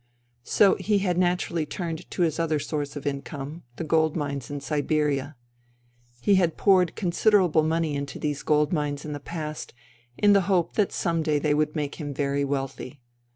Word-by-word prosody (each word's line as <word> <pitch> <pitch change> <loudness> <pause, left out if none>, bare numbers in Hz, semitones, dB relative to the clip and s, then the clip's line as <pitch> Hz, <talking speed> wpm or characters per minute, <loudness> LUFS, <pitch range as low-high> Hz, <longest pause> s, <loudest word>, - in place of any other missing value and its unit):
So 195 - +4
he 205 +2 +1
had 180 -3 0
naturally 175 -2 +1
turned 165 -2 -5
to 180 - 0
his 160 -2 0
other 160 -2 +1
source 145 -1 -3
of 145 0 -7
income 140 +2 -5
— - - -41
• - - -33
the - - -3
gold 160 0 +2
mines 140 -5 -3
in 145 0 -4
Siberia. 145 0 -1 0.9
He 200 - +3
had 170 -2 0
poured 185 -4 +4
con 180 -4 -1
siderable 180 -5 +4
money 160 -1 0
into 140 0 -4
these 145 -1 -2
gold 150 +1 +2
mines 145 -2 -2
in 150 - -4
the 145 - -5
past, 155 -2 -6 0.4
in 205 -1 +5
the 200 - +5
hope 175 -3 +2
that 210 -3 +1
some 165 -2 0
day 155 -2 +1
they 145 0 +1
would 150 +1 0
make 150 +1 -3
him 145 -2 -5
very 140 0 0
wealthy. 135 0 -4
155 Hz, 195 wpm, -26 LUFS, 145-170 Hz, 0.9 s, in